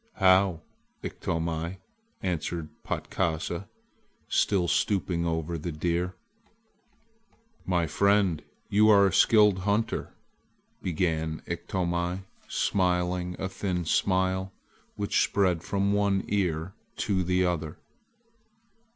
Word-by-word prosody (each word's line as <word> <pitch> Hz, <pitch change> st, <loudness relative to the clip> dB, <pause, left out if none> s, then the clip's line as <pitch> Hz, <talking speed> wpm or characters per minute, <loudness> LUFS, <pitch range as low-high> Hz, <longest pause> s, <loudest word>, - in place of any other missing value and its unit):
"How, 95 Hz, -3 st, +4 dB, 0.4 s
Iktomi!" 80 Hz, +2 st, -3 dB, 0.5 s
answered 85 Hz, -3 st, -2 dB
Patkasa, 85 Hz, +1 st, -2 dB, 0.6 s
still 95 Hz, -4 st, +2 dB
stooping 90 Hz, -3 st, +1 dB
over 80 Hz, 0 st, -2 dB
the 85 Hz, +3 st, -4 dB
deer. 85 Hz, +3 st, -1 dB, 1.5 s
"My 90 Hz, -2 st, +2 dB
friend, 100 Hz, +1 st, +2 dB, 0.3 s
you 105 Hz, +2 st, +4 dB
are 100 Hz, -2 st, +7 dB
a 95 Hz, -, +1 dB
skilled 105 Hz, -2 st, +5 dB
hunter," 105 Hz, +4 st, -1 dB, 0.7 s
began 80 Hz, -3 st, -1 dB
Iktomi, 85 Hz, +1 st, -2 dB, 0.2 s
smiling 90 Hz, -1 st, 0 dB
a 95 Hz, -, -2 dB
thin 95 Hz, -2 st, -2 dB
smile 95 Hz, +2 st, +1 dB, 0.4 s
which 100 Hz, -1 st, +1 dB
spread 90 Hz, -4 st, +1 dB
from 100 Hz, +2 st, 0 dB
one 100 Hz, -1 st, +2 dB
ear 90 Hz, -3 st, -1 dB, 0.2 s
to 100 Hz, -6 st, 0 dB
the 90 Hz, +1 st, +2 dB
other. 80 Hz, -3 st, -2 dB
90 Hz, 95 wpm, -28 LUFS, 85-95 Hz, 1.5 s, are